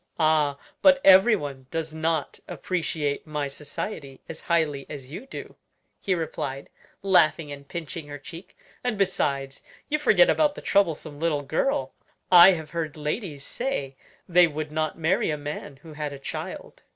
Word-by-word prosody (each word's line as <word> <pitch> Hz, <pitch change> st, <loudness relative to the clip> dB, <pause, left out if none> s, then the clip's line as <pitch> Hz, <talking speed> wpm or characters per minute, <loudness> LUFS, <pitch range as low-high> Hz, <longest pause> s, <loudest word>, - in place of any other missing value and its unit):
"Ah! 155 Hz, -3 st, +2 dB, 0.2 s
but 275 Hz, -1 st, +6 dB
everyone 185 Hz, -, +5 dB
does 160 Hz, -1 st, -3 dB
not 160 Hz, -1 st, -1 dB
appreciate 155 Hz, -5 st, -2 dB
my 150 Hz, -2 st, -2 dB
society 145 Hz, 0 st, -6 dB
as 160 Hz, -, -7 dB
highly 155 Hz, -5 st, 0 dB
as 135 Hz, -2 st, -8 dB
you 255 Hz, -, -8 dB
do," -, -, -8 dB, 0.4 s
he 190 Hz, -, 0 dB
replied, 145 Hz, -4 st, -4 dB, 0.3 s
laughing 165 Hz, -5 st, +3 dB
and 140 Hz, 0 st, -9 dB
pinching 160 Hz, -1 st, -6 dB
her 145 Hz, 0 st, -7 dB
cheek; 170 Hz, +5 st, -12 dB, 0.3 s
"and 245 Hz, -4 st, -1 dB
besides, 140 Hz, -8 st, 0 dB, 0.3 s
you 300 Hz, +1 st, +1 dB
forget -, -, +5 dB
about 300 Hz, -9 st, +2 dB
the -, -, -8 dB
troublesome 160 Hz, -6 st, 0 dB
little 155 Hz, -3 st, 0 dB
girl. 140 Hz, -, -1 dB, 0.4 s
I 180 Hz, +1 st, +10 dB
have 160 Hz, -3 st, -6 dB
heard 160 Hz, -3 st, -3 dB
ladies 150 Hz, -, -4 dB
say 190 Hz, -, -3 dB, 0.3 s
they 175 Hz, -1 st, +6 dB
would 155 Hz, -1 st, -5 dB
not 155 Hz, 0 st, -2 dB
marry 165 Hz, +3 st, +1 dB
a 150 Hz, -, -1 dB
man 145 Hz, -1 st, -6 dB
who 160 Hz, -2 st, -11 dB
had 150 Hz, -1 st, -4 dB
a -, -, -7 dB
child." 135 Hz, -, -7 dB
155 Hz, 155 wpm, -25 LUFS, 145-175 Hz, 0.4 s, I